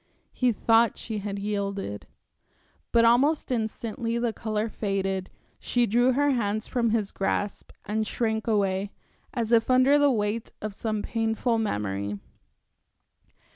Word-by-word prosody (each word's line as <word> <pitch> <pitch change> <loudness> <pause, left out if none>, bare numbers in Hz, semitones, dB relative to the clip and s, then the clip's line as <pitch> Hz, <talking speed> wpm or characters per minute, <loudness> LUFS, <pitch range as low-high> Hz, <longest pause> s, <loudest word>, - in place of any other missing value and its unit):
He 250 -1 +2
thought 225 +1 +3
she 220 -2 -4
had 200 0 -4
yielded. 200 - -3 0.8
But 230 0 +5
almost 270 +6 +3
instantly 230 0 -2
the 235 -1 0
color 215 -1 -2
faded, 195 -3 -2 0.3
she 245 -1 +1
drew 245 +4 +3
her 285 +2 +2
hands 215 -3 -1
from 235 -2 +1
his 215 -3 0
grasp 200 +1 -2 0.2
and 215 +1 -1
shrank 220 -1 -1
away, 200 -2 +1 0.4
as 235 -4 -2
if 230 0 +4
under 255 +3 +5
the 290 0 +5
weight 215 -1 -1
of 215 -1 -5
some 215 0 -3
painful 225 +1 0
memory. 100 - -2
220 Hz, 135 wpm, -26 LUFS, 205-235 Hz, 0.8 s, But